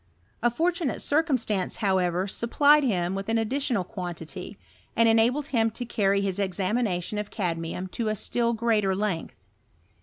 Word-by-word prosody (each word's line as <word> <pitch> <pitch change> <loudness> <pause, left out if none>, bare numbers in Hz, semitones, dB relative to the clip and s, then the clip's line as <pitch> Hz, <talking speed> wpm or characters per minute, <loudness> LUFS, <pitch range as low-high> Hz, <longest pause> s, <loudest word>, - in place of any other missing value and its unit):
A 240 - +4
fortunate 335 +4 -1
circumstance, 260 - 0
however, 185 -3 +1
supplied 285 +8 +4
him 185 -7 0
with 195 +2 -4
an 225 - +2
additional 235 -2 0
quantity, 175 - -7 0.4
and 230 0 +4
en 225 0 +5
abled 250 +6 +2
him 225 -3 +3
to 245 +3 -6
carry 200 -4 +1
his 195 -1 -2
examination 195 0 -1
of 210 0 -4
cadmium 170 -2 -3
to 230 - -3
k 215 - 0
still 235 +2 0
greater 215 -4 +1
length. 195 -5 -2
215 Hz, 150 wpm, -26 LUFS, 190-240 Hz, 0.4 s, en